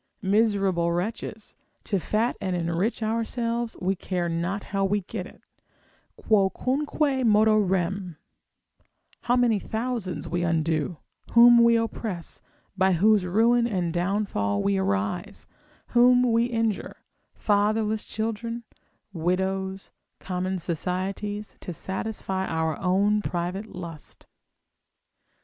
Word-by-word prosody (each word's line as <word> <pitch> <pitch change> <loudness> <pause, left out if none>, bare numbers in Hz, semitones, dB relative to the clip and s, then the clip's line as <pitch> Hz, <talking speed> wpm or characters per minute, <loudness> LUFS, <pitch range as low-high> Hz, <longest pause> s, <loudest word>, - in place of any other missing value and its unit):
Miserable 195 -4 +2
wretches, 205 +4 -4 0.3
to 200 - -1
fat 220 +7 0
and 185 -2 -1
enrich 175 +7 -1
ourselves, 230 +1 -2
we 190 +1 0
care 180 -1 -2
not 170 +4 -2
how 195 0 +1
we 200 +1 +1
get 185 0 -6
it, - - -18 0.7
Quocunque 265 +7 +1
modo 215 -1 +5
rem; 190 -3 0 1.1
how 245 - +3
many 240 -4 +3
thousands 220 -4 -3
we 175 0 -1
undo, 165 -1 0 0.4
whom 235 0 +8
we 235 0 +5
oppress, 220 -5 -3 0.3
by 190 -1 +3
whose 200 +2 +3
ruin 235 +5 +3
and 180 -7 -1
downfall 175 - 0
we 100 0 +2
arise, 95 +1 -2 0.4
whom 245 0 +5
we 230 +1 +3
injure, 225 -3 -2 0.4
fatherless 215 +1 +1
children, 230 +2 -4 0.5
widows, 190 +3 -2 0.3
common 185 0 -2
societies, 190 +5 -3
to - - -6
satisfy 190 +1 -3
our 160 -1 -1
own 200 +3 +2
private 180 +3 -3
lust. 170 -6 -10
195 Hz, 110 wpm, -26 LUFS, 180-225 Hz, 1.1 s, whom